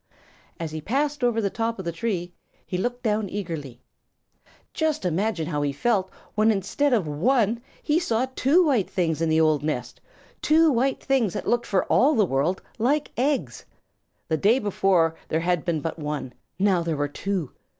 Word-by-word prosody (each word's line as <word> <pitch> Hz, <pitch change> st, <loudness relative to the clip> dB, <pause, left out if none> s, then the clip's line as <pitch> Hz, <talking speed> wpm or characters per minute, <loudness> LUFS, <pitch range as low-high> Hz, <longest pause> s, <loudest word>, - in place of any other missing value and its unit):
As 165 Hz, -2 st, -4 dB
he 155 Hz, 0 st, -5 dB
passed 285 Hz, -, -1 dB
over 240 Hz, -2 st, +2 dB
the 200 Hz, -3 st, 0 dB
top 230 Hz, 0 st, -2 dB
of 190 Hz, -, -7 dB
the 170 Hz, -, -1 dB
tree, 175 Hz, -1 st, -3 dB, 0.3 s
he -, -, -5 dB
looked 245 Hz, +6 st, -2 dB
down 215 Hz, -3 st, 0 dB
eagerly. 160 Hz, -11 st, -6 dB, 0.9 s
Just 315 Hz, -, -1 dB
imagine 180 Hz, 0 st, 0 dB
how 150 Hz, -2 st, -2 dB
he 145 Hz, -1 st, 0 dB
felt 190 Hz, +5 st, 0 dB, 0.2 s
when 215 Hz, +1 st, +3 dB
instead 220 Hz, +8 st, +1 dB
of 215 Hz, -10 st, +2 dB
one, 225 Hz, -, +1 dB, 0.2 s
he 300 Hz, +2 st, +2 dB
saw 240 Hz, -8 st, 0 dB
two 330 Hz, +7 st, +4 dB
white 255 Hz, -, +2 dB
things 165 Hz, -4 st, -1 dB
in 165 Hz, -, +1 dB
the 160 Hz, 0 st, +3 dB
old 155 Hz, -3 st, +3 dB
nest 125 Hz, -5 st, -4 dB, 0.4 s
two 320 Hz, 0 st, +4 dB
white 265 Hz, +2 st, 0 dB
things 260 Hz, -8 st, +1 dB
that -, -, -5 dB
looked 240 Hz, 0 st, +1 dB
for 190 Hz, -, +1 dB
all 290 Hz, +3 st, +4 dB
the 215 Hz, -4 st, +4 dB
world 155 Hz, +5 st, 0 dB, 0.2 s
like 280 Hz, +6 st, +1 dB
eggs! 275 Hz, +3 st, -1 dB, 0.6 s
The 160 Hz, -, 0 dB
day 210 Hz, -, +4 dB
before 195 Hz, -7 st, +2 dB
there 160 Hz, -, 0 dB
had 175 Hz, -2 st, 0 dB
been 170 Hz, -4 st, -1 dB
but 165 Hz, +2 st, -4 dB
one; 150 Hz, -4 st, -4 dB, 0.2 s
now 190 Hz, -2 st, +3 dB
there 165 Hz, -2 st, -2 dB
were 145 Hz, 0 st, 0 dB
two. 180 Hz, 0 st, -3 dB
195 Hz, 180 wpm, -25 LUFS, 160-240 Hz, 0.9 s, two